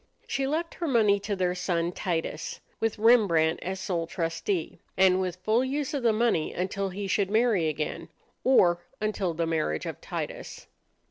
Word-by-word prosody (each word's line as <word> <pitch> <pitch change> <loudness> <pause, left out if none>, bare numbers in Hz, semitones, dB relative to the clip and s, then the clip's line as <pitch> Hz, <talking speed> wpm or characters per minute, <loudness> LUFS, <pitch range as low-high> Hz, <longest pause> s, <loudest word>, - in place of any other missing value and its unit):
She 270 -1 -1
left 325 +4 -2
her 340 - -4
money 215 -7 +4
to 200 +1 -3
their 180 -1 0
son 175 -2 -1
Titus, 165 -3 -3 0.2
with 225 -1 0
Rembrandt 205 -8 +4
as 190 +1 -4
sole 170 -3 -2
trustee, 165 +1 -2 0.2
and 190 0 +5
with 180 -2 -2
full 220 +5 +3
use 275 +2 -2
of 280 - -1
the 235 -2 +4
money 215 -8 +1
until 195 +2 -2
he 200 +2 -5
should 195 0 +1
marry 215 -6 +3
again 155 0 -3 0.3
or 175 -10 +5 0.2
until 205 -5 -1
the 165 +1 0
marriage 155 - -1
of - - -6
Titus. - - -6
190 Hz, 165 wpm, -27 LUFS, 170-225 Hz, 0.3 s, and